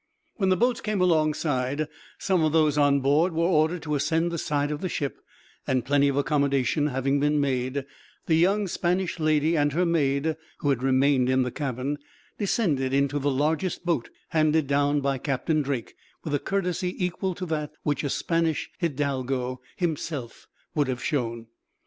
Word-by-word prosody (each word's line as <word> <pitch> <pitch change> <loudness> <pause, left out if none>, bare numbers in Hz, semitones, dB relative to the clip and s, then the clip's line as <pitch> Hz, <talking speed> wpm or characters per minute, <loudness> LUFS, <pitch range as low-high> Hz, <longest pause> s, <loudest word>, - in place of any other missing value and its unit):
When 195 -4 +1
the 185 - +3
boats 245 +5 +1
came 215 -2 -1
alongside, 155 -4 +1 0.3
some 185 -4 +1
of 155 - +2
those 155 -2 +3
on 145 -1 +3
board 150 +6 +3
were 165 +1 +1
ordered 165 0 +2
to 150 -2 -3
ascend 160 +4 +1
the 170 - -3
side 145 0 -1
of 150 - -4
the 185 - -2
ship; 140 -5 -3 0.5
and, 130 -2 +1
plenty 140 0 +3
of 140 - 0
accommodation 140 0 +1
having 135 +1 0
been 150 +1 +2
made, 130 0 -1 0.4
the 165 - +1
young 195 +5 +3
Spanish 180 0 -1
lady 155 +1 +2
and 145 -2 +2
her 180 +4 +2
maid, 155 -1 +1 0.2
who 145 - -1
had 130 - 0
remained 130 0 +3
in 130 0 +3
the 125 - -3
cabin, 140 +1 -3 0.4
descended 150 - +1
into 140 +1 +1
the 145 +1 0
largest 155 +7 0
boat; 165 -9 0 0.2
handed 155 -1 +2
down 145 +1 +2
by 135 -1 0
Captain 150 +3 0
Drake, 135 -5 -3 0.3
with 155 - -4
a 145 - +2
courtesy 180 -1 -1
equal 180 0 -2
to 180 - -5
that 155 -3 -3
which 145 0 0
a 145 - -1
Spanish 165 0 0
hidalgo 135 -5 -2
himself 155 -7 -4 0.3
would 150 -4 +1
have 130 -1 -3
shown. 115 -5 -2
150 Hz, 175 wpm, -26 LUFS, 140-165 Hz, 0.5 s, the